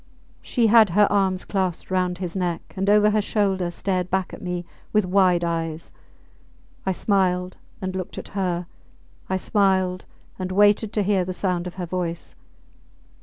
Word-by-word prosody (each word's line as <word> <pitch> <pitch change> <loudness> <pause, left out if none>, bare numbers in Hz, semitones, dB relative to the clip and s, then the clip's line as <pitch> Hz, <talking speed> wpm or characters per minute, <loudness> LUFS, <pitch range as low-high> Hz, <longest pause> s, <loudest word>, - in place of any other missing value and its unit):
She 240 - 0
had 220 -1 +6
her 205 +4 +5
arms 190 -2 +1
clasped 190 -3 -2
round 180 -1 0
his 180 -1 -4
neck, 175 -3 -3
and 195 +1 0
over 210 0 +5
her 215 0 +2
shoulder 195 -4 0
stared 185 0 -2
back 190 0 -1
at - - -9
me 180 -1 -4 0.3
with 210 -2 +2
wide 180 -2 +3
eyes. 165 -1 -3 1.0
I - - +3
smiled 185 -2 0 0.3
and 185 0 -3
looked 185 -1 -5
at - - -7
her; 180 -3 -2 0.6
I 190 - +1
smiled 190 -2 +1 0.3
and 185 0 -3
waited 205 +2 +4
to 210 - +1
hear 195 -1 +2
the 185 +1 -4
sound 180 -2 -1
of 180 - -8
her 180 -2 -4
voice. 170 -1 -4
185 Hz, 165 wpm, -23 LUFS, 180-200 Hz, 1.0 s, had